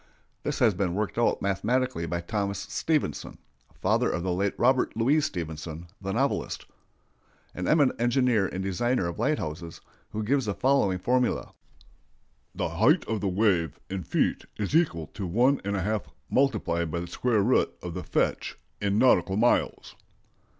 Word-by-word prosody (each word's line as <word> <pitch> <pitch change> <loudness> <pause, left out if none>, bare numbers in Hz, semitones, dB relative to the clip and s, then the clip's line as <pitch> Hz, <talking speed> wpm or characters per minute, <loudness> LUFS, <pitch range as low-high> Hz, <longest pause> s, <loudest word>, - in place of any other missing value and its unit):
This - - -2
has 115 -4 +4
been 90 -1 -1
worked 105 +2 -2
out 120 - +1
mathematically 105 0 0
by 85 0 -2
Thomas 100 +2 -2
Stevenson 150 - -2 0.4
(father - - +2
of 85 - -2
the 95 - -1
late 100 +2 0
Robert 125 -2 +2
Louis 135 +7 +3
Stevenson, 80 - -5
the 95 0 -3
novelist), - - -1 0.9
an 90 - -4
eminent 145 -6 +3
engineer 120 -4 +3
and 95 +1 -4
designer 95 +2 0
of 85 - -6
lighthouses, 85 - -2 0.3
who 110 - -3
gives 135 +3 +1
the 100 -2 -2
following 130 -9 +2
formula: 125 +5 0 1.0
"The - - -1
height - - +3
of 110 -2 -2
the 100 - 0
wave 90 -5 +1
in 95 -1 -2
feet - - 0
is 105 +7 -2
equal 85 - +2
to 95 -4 -4
1½ 105 -3 +1 0.3
multiplied 95 -11 +1
by 85 +2 -2
the 85 - -4
square 110 +3 +1
root 125 +5 +3
of 90 -1 -5
the - - -5
fetch - - -1 0.2
in 100 0 +1
nautical 110 -5 +4
miles." 120 +3 +1
100 Hz, 150 wpm, -27 LUFS, 90-125 Hz, 1.0 s, has